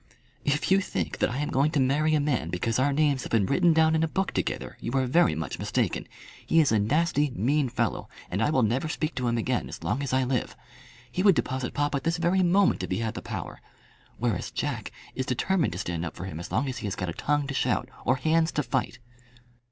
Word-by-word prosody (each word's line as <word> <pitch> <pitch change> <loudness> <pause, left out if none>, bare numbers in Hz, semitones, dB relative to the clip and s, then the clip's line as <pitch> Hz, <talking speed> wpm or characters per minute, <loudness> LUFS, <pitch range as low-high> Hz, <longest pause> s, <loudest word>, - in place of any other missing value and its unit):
"If 145 +5 0
you 195 +1 +5
think - - -3
that - - +2
I 125 - -3
am 150 +1 -2
going 140 +3 +3
to 150 - +2
marry 150 +4 +2
a - - +3
man 135 - 0
because 110 +7 -1
our 140 +2 +3
names 145 -2 +2
have - - -7
been 110 -4 +3
written 170 - +3
down 160 0 +4
in 160 - +2
a 160 - +2
book 190 +4 -1
together, - - -3
you - - -4
are 135 -1 +2
very 130 - +3
much 80 +1 -4
mistaken. - - -1 0.4
He 165 - +3
is 155 - +4
a 110 - +3
nasty 150 +6 +2
mean 135 +6 +1
fellow, 120 - -2 0.2
and 95 +4 -1
I 115 - +3
will 130 -5 +2
never 120 +8 +1
speak 155 0 -2
to 125 -1 -2
him 120 0 +1
again 120 +2 -1
as - - -8
long 135 - -1
as 140 - -3
I 130 0 +2
live. 125 -1 -1 0.6
He 180 - -1
would 195 -2 +6
deposit 130 -4 -2
papa 145 -1 0
this 165 +1 0
very 175 +3 +2
moment 185 +2 +3
if - - -4
he - - -1
had 115 -1 -2
the - - -6
power. - - -6 0.6
Whereas 115 -6 -1
Jack - - -3 0.2
is 130 - -3
determined 165 - +1
to - - -5
stand 85 -3 -3
up 80 - -5
for 90 - -6
him 80 -4 -6
as 85 - -7
long 135 +5 +1
as 130 - -4
he - - -4
has 100 - -3
got 90 - -3
a - - -3
tongue 145 - 0
to 135 - -4
shout - - 0 0.2
or 130 - +3
hands 160 +5 +2
to 150 - 0
fight." 115 -1 -2
135 Hz, 245 wpm, -27 LUFS, 115-155 Hz, 0.6 s, would